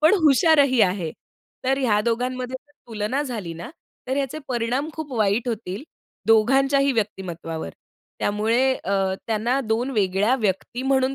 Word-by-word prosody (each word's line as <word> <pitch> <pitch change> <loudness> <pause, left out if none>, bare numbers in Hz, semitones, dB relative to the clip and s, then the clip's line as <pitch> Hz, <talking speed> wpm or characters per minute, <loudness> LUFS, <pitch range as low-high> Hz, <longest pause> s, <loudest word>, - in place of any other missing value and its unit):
पण 315 +6 +6
हुशारही 280 -2 +5
आहे. 180 -4 +1 0.5
तर 265 +1 +2
ह्या 225 -6 +2
दोघांमध्ये 250 +2 -1
जर 290 +1 -32
तुलना 225 +5 -2
झाली 220 - -5
ना, 170 +5 -8 0.4
तर 260 +1 -1
याचे 280 +2 -2
परिणाम 245 +4 -1
खूप 305 -4 -7
वाईट 215 +4 +1
होतील, 215 -2 -4 0.4
दोघांच्याही 270 +5 +4
व्यक्तिमत्त्वावर. 175 - -3 0.5
त्यामुळे 220 +5 +1 0.2
अ, 195 -1 +1
त्यांना 230 +4 0
2 235 +4 0
वेगळ्या 205 +1 +2
व्यक्ती 210 +4 -1
म्हणून 265 0 +2
235 Hz, 135 wpm, -23 LUFS, 205-270 Hz, 0.5 s, पण